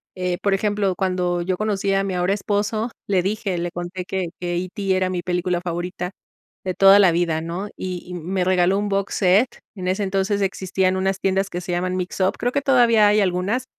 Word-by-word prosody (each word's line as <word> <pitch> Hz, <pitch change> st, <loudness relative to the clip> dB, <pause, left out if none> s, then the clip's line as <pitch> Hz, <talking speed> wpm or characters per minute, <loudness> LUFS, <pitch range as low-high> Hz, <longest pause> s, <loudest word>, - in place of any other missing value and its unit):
eh, 180 Hz, -1 st, -1 dB
por 200 Hz, -1 st, +1 dB
ejemplo, 200 Hz, -2 st, 0 dB
cuando 180 Hz, -2 st, 0 dB
yo 180 Hz, +1 st, -1 dB
conocí 200 Hz, -2 st, 0 dB
a 195 Hz, 0 st, +2 dB
mi 195 Hz, -1 st, -2 dB
ahora 180 Hz, +2 st, +1 dB
esposo, 210 Hz, +3 st, -1 dB, 0.2 s
le 190 Hz, -3 st, +2 dB
dije, 195 Hz, -1 st, -2 dB
le 175 Hz, 0 st, -3 dB
conté 175 Hz, +1 st, -5 dB
que 185 Hz, -2 st, -2 dB
que 175 Hz, -1 st, -2 dB
E.T, 190 Hz, +2 st, -1 dB
era 185 Hz, 0 st, +1 dB
mi 180 Hz, -1 st, -2 dB
película 180 Hz, -1 st, -1 dB
favorita, 180 Hz, +1 st, -4 dB, 0.5 s
de 185 Hz, -1 st, -2 dB
toda 195 Hz, +2 st, +7 dB
la 190 Hz, -4 st, +6 dB
vida, 165 Hz, -2 st, 0 dB
¿no? 175 Hz, +5 st, -4 dB
Y 180 Hz, -1 st, -5 dB
y 180 Hz, -, -7 dB
me 180 Hz, +2 st, -2 dB
regaló 185 Hz, +1 st, +3 dB
un 205 Hz, 0 st, -2 dB
box 195 Hz, 0 st, -1 dB
set. 200 Hz, +6 st, +3 dB, 0.2 s
En 180 Hz, -1 st, -5 dB
ese 190 Hz, +3 st, 0 dB
entonces, 195 Hz, +1 st, 0 dB
existían 190 Hz, -1 st, 0 dB
unas 190 Hz, 0 st, 0 dB
tiendas 195 Hz, 0 st, 0 dB
que 175 Hz, -, -4 dB
se 175 Hz, -, -5 dB
llaman 180 Hz, +1 st, -1 dB
Mixup, 185 Hz, +1 st, -1 dB
creo 245 Hz, +1 st, -1 dB
que 280 Hz, -, 0 dB
todavía 235 Hz, -6 st, +5 dB
hay 210 Hz, +1 st, +4 dB
algunas, 195 Hz, +7 st, 0 dB
190 Hz, 210 wpm, -22 LUFS, 180-200 Hz, 0.5 s, toda